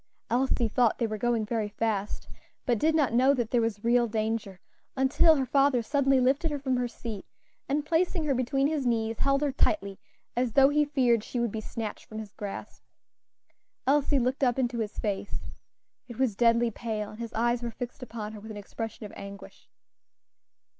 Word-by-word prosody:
Elsie 250 Hz, -1 st, +2 dB
thought 235 Hz, 0 st, +2 dB
they 235 Hz, -, 0 dB
were 215 Hz, -1 st, -2 dB
going 235 Hz, -1 st, +1 dB
very 215 Hz, -1 st, -1 dB
fast, 210 Hz, -1 st, -2 dB, 0.4 s
but 240 Hz, -4 st, +1 dB
did 315 Hz, +5 st, +3 dB
not 285 Hz, -7 st, +2 dB
know 260 Hz, +4 st, +5 dB
that 240 Hz, -3 st, -2 dB
there 240 Hz, -, +3 dB
was 225 Hz, -2 st, -2 dB
real 240 Hz, +1 st, +3 dB
danger 215 Hz, -3 st, -2 dB, 0.4 s
until 265 Hz, +5 st, +5 dB
her 270 Hz, -3 st, 0 dB
father 275 Hz, -2 st, +3 dB
suddenly 270 Hz, +1 st, +3 dB
lifted 270 Hz, +6 st, +2 dB
her 295 Hz, -, -2 dB
from 265 Hz, -2 st, 0 dB
her 245 Hz, 0 st, 0 dB
seat, 225 Hz, -4 st, -7 dB, 0.5 s
and 290 Hz, +2 st, 0 dB
placing 335 Hz, +1 st, +1 dB
her 295 Hz, -2 st, +1 dB
between 265 Hz, +2 st, +1 dB
his 300 Hz, -1 st, 0 dB
knees, 225 Hz, -2 st, 0 dB
held 275 Hz, 0 st, +2 dB
her 290 Hz, -, +1 dB
tightly, 200 Hz, -7 st, 0 dB, 0.4 s
as 245 Hz, -2 st, 0 dB
though 270 Hz, 0 st, +6 dB
he 295 Hz, +1 st, +3 dB
feared 250 Hz, -6 st, +2 dB
she 245 Hz, -, -4 dB
would 235 Hz, -2 st, 0 dB
be 220 Hz, -, -4 dB
snatched 220 Hz, 0 st, -6 dB
from 215 Hz, -, -8 dB
his 215 Hz, -2 st, -7 dB
grasp. 200 Hz, -1 st, -7 dB, 1.0 s
Elsie 285 Hz, +1 st, +3 dB
looked 260 Hz, +2 st, 0 dB
up 245 Hz, -1 st, +3 dB
into 245 Hz, -2 st, 0 dB
his 215 Hz, -2 st, -3 dB
face. 200 Hz, -2 st, -3 dB, 0.6 s
It 240 Hz, -3 st, -9 dB
was 260 Hz, -6 st, +1 dB
deadly 235 Hz, +1 st, +3 dB
pale, 215 Hz, -2 st, -4 dB
and 215 Hz, -, -12 dB
his 230 Hz, -1 st, -6 dB
eyes 235 Hz, +1 st, +1 dB
were 240 Hz, -, -3 dB
fixed 240 Hz, +3 st, -7 dB
upon 225 Hz, -4 st, -6 dB
her 215 Hz, -, -8 dB
with 220 Hz, +2 st, -11 dB
an 215 Hz, -, -7 dB
expression 220 Hz, +2 st, -6 dB
of 205 Hz, -, -9 dB
anguish. 200 Hz, 0 st, -10 dB
240 Hz, 195 wpm, -28 LUFS, 220-270 Hz, 1.0 s, though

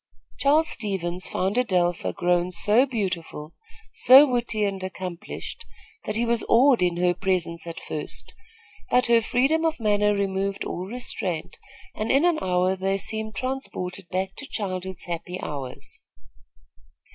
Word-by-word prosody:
Charles 305 Hz, +3 st, +4 dB
Stevens 185 Hz, -4 st, -2 dB
found 195 Hz, +5 st, -1 dB
Adelpha 180 Hz, -8 st, +1 dB
grown 175 Hz, 0 st, +1 dB
so 215 Hz, +8 st, +4 dB
beautiful, 185 Hz, -, -4 dB, 0.4 s
so 265 Hz, +3 st, +8 dB
witty 240 Hz, -5 st, -1 dB
and 195 Hz, -1 st, -3 dB
accomplished, 185 Hz, -, -6 dB, 0.4 s
that 215 Hz, -, -3 dB
he 235 Hz, +2 st, +1 dB
was 235 Hz, -1 st, +2 dB
awed 250 Hz, 0 st, +5 dB
in 175 Hz, -1 st, +1 dB
her 180 Hz, 0 st, +2 dB
presence 175 Hz, -3 st, -2 dB
at 165 Hz, -, -6 dB
first; 150 Hz, -, -6 dB, 0.6 s
but 250 Hz, 0 st, +4 dB
her 235 Hz, -1 st, +5 dB
freedom 270 Hz, +8 st, +1 dB
of 325 Hz, -2 st, 0 dB
manner 210 Hz, -1 st, +2 dB
removed 195 Hz, 0 st, -1 dB
all 180 Hz, +2 st, -4 dB
restraint, 185 Hz, -7 st, -3 dB, 0.3 s
and 215 Hz, +1 st, -3 dB
in 275 Hz, +5 st, +4 dB
an 345 Hz, -3 st, +2 dB
hour 185 Hz, +1 st, +1 dB
they 195 Hz, +1 st, 0 dB
seemed 220 Hz, +2 st, -3 dB
transported 195 Hz, -9 st, -4 dB
back 190 Hz, +1 st, -2 dB
to 285 Hz, -, -8 dB
childhood's 190 Hz, -5 st, -4 dB
happy 175 Hz, +1 st, -5 dB
hours. 135 Hz, -4 st, -7 dB
195 Hz, 140 wpm, -25 LUFS, 180-235 Hz, 0.6 s, so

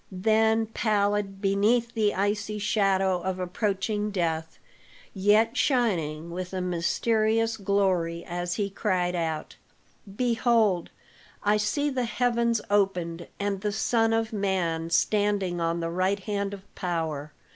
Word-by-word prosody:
Then 220 Hz, +3 st, +2 dB
pallid 205 Hz, -3 st, 0 dB
beneath 215 Hz, +4 st, +2 dB
the 215 Hz, -3 st, +1 dB
icy 205 Hz, +2 st, -1 dB
shadow 195 Hz, -3 st, +1 dB
of 190 Hz, 0 st, -2 dB
approaching 205 Hz, +3 st, -1 dB
death, 165 Hz, -4 st, -2 dB, 0.6 s
yet 210 Hz, +4 st, +3 dB
shining 170 Hz, -, 0 dB
with 185 Hz, +1 st, -5 dB
a 190 Hz, -, -2 dB
mysterious 220 Hz, +6 st, +1 dB
glory 190 Hz, -5 st, 0 dB
as 175 Hz, 0 st, -3 dB
he 200 Hz, 0 st, -2 dB
cried 185 Hz, -3 st, 0 dB
out, 160 Hz, -2 st, -3 dB, 0.6 s
"Behold, 230 Hz, -6 st, +2 dB, 0.5 s
I 210 Hz, +1 st, +3 dB
see 285 Hz, +8 st, 0 dB
the 255 Hz, -2 st, -1 dB
heavens 235 Hz, -1 st, +1 dB
opened, 180 Hz, -4 st, 0 dB
and 200 Hz, -1 st, -2 dB
the 210 Hz, 0 st, -1 dB
Son 225 Hz, +1 st, +1 dB
of 225 Hz, 0 st, 0 dB
Man 180 Hz, -5 st, -1 dB
standing 200 Hz, -1 st, +1 dB
on 165 Hz, +1 st, 0 dB
the 165 Hz, 0 st, -2 dB
right 185 Hz, +3 st, 0 dB
hand 200 Hz, 0 st, -2 dB
of 195 Hz, -, -14 dB
power." 160 Hz, -4 st, -3 dB
200 Hz, 125 wpm, -27 LUFS, 180-220 Hz, 0.6 s, yet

